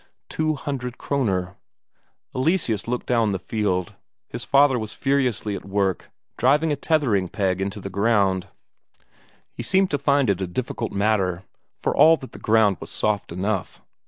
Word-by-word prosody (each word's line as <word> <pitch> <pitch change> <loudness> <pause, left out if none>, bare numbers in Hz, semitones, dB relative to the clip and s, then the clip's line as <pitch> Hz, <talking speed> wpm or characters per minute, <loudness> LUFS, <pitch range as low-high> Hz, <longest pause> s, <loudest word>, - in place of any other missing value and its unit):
Two 155 -1 0
hundred 130 -4 -5
Kroner. 95 -10 -1 0.8
Eleseus 130 - 0
looked 125 +1 -2
down 115 -4 +2
the - - 0
field: 95 -3 -2 0.3
his - - -6
father 140 -2 +4
was 110 -1 -6
furiously 130 -7 0
at - - -7
work 100 -1 -1 0.3
driving 150 +6 +3
a - - +1
tethering 135 - +1
peg 95 -3 -1
into 100 +2 -3
the 100 - -6
ground; 100 -2 +1 1.0
he - - -7
seemed 190 0 +2
to 145 - 0
find 140 -1 +2
it 95 -1 -2
a 95 - -1
difficult 115 +4 -4
matter, 100 -3 0 0.3
for - - -1
all 160 +1 +7
that 130 -2 -10
the - - -11
ground 110 -4 +3
was - - -8
soft 105 -4 -1
enough. 95 +2 -3
110 Hz, 160 wpm, -23 LUFS, 95-140 Hz, 1.0 s, all